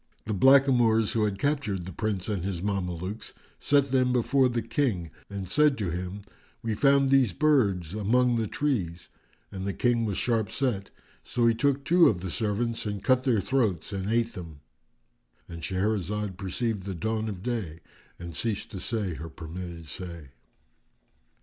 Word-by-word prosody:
The 110 Hz, -, -2 dB
blackamoors 120 Hz, -1 st, +5 dB
who 110 Hz, -2 st, +1 dB
had 100 Hz, -2 st, -2 dB
captured 115 Hz, -, -1 dB
the 95 Hz, -, -6 dB
Prince 100 Hz, 0 st, -2 dB
and 100 Hz, -5 st, -2 dB
his 95 Hz, -2 st, -3 dB
Mamelukes 95 Hz, 0 st, -3 dB, 0.3 s
set 140 Hz, -2 st, +2 dB
them 130 Hz, -1 st, +3 dB
before 125 Hz, +2 st, +3 dB
the 120 Hz, -2 st, -1 dB
King 110 Hz, -, -1 dB, 0.2 s
and 100 Hz, -2 st, -5 dB
said 150 Hz, +7 st, +3 dB
to 100 Hz, -6 st, -2 dB
him, 90 Hz, +3 st, -4 dB, 0.4 s
"We 115 Hz, -1 st, -1 dB
found 140 Hz, +3 st, +4 dB
these 130 Hz, -8 st, +4 dB
birds 100 Hz, -, +2 dB
among 120 Hz, +4 st, +2 dB
the 110 Hz, -1 st, 0 dB
trees"; 95 Hz, -, -2 dB, 0.4 s
and 95 Hz, -1 st, -6 dB
the 100 Hz, 0 st, -2 dB
King 120 Hz, -2 st, +2 dB
was 100 Hz, -4 st, -2 dB
sharp 115 Hz, -4 st, 0 dB
set; 115 Hz, -8 st, -1 dB, 0.3 s
so 120 Hz, -1 st, 0 dB
he 115 Hz, -, +5 dB
took 140 Hz, +4 st, 0 dB
two 175 Hz, 0 st, +6 dB
of 90 Hz, -6 st, -1 dB
the 95 Hz, -2 st, -4 dB
servants 115 Hz, +2 st, -1 dB
and 100 Hz, -2 st, -4 dB
cut 130 Hz, 0 st, +3 dB
their 115 Hz, -6 st, +3 dB
throats 105 Hz, -8 st, 0 dB
and 95 Hz, +1 st, -3 dB
ate 115 Hz, 0 st, +1 dB
them;——And 80 Hz, -, -14 dB
Shahrazad 100 Hz, +1 st, -1 dB
perceived 100 Hz, +2 st, -3 dB
the 95 Hz, -, -3 dB
dawn 110 Hz, +4 st, -2 dB
of 95 Hz, -3 st, -7 dB
day 105 Hz, -10 st, -3 dB, 0.4 s
and 85 Hz, -2 st, -8 dB
ceased 110 Hz, +2 st, -2 dB
to 95 Hz, -, -6 dB
say 105 Hz, -3 st, -2 dB
her 80 Hz, +1 st, -7 dB
permitted 85 Hz, +1 st, -8 dB
say. 85 Hz, -1 st, -7 dB
105 Hz, 165 wpm, -27 LUFS, 90-120 Hz, 0.4 s, two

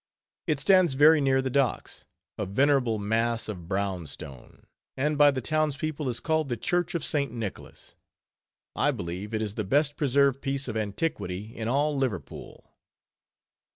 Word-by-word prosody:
It 150 Hz, -3 st, +1 dB
stands 180 Hz, -2 st, +4 dB
very 150 Hz, +2 st, +6 dB
near 135 Hz, -1 st, +2 dB
the 130 Hz, -, -2 dB
docks, 135 Hz, -3 st, -1 dB, 0.3 s
a 105 Hz, -, -4 dB
venerable 130 Hz, +1 st, +2 dB
mass 115 Hz, +2 st, 0 dB
of 90 Hz, -6 st, -7 dB
brown 95 Hz, -3 st, -2 dB
stone, 65 Hz, -2 st, -11 dB, 0.3 s
and 150 Hz, +3 st, 0 dB
by 145 Hz, 0 st, +6 dB
the 135 Hz, -2 st, -1 dB
town's 155 Hz, +1 st, 0 dB
people 155 Hz, -2 st, -3 dB
is 120 Hz, -, -3 dB
called 160 Hz, -3 st, 0 dB
the 120 Hz, -, -2 dB
Church 175 Hz, -, -1 dB
of 165 Hz, -, -1 dB
St. 140 Hz, -3 st, 0 dB
Nicholas. 115 Hz, -5 st, -7 dB, 0.8 s
I -, -, +2 dB
believe 90 Hz, +5 st, -4 dB
it 110 Hz, -1 st, -1 dB
is 105 Hz, -2 st, -4 dB
the 110 Hz, -, -3 dB
best 145 Hz, +8 st, +1 dB
preserved 140 Hz, -2 st, +2 dB
piece 140 Hz, 0 st, -2 dB
of 115 Hz, -, -4 dB
antiquity 105 Hz, -, -3 dB
in 110 Hz, -1 st, -4 dB
all 145 Hz, +4 st, +1 dB
Liverpool. 130 Hz, -10 st, -5 dB
130 Hz, 160 wpm, -27 LUFS, 110-145 Hz, 0.8 s, very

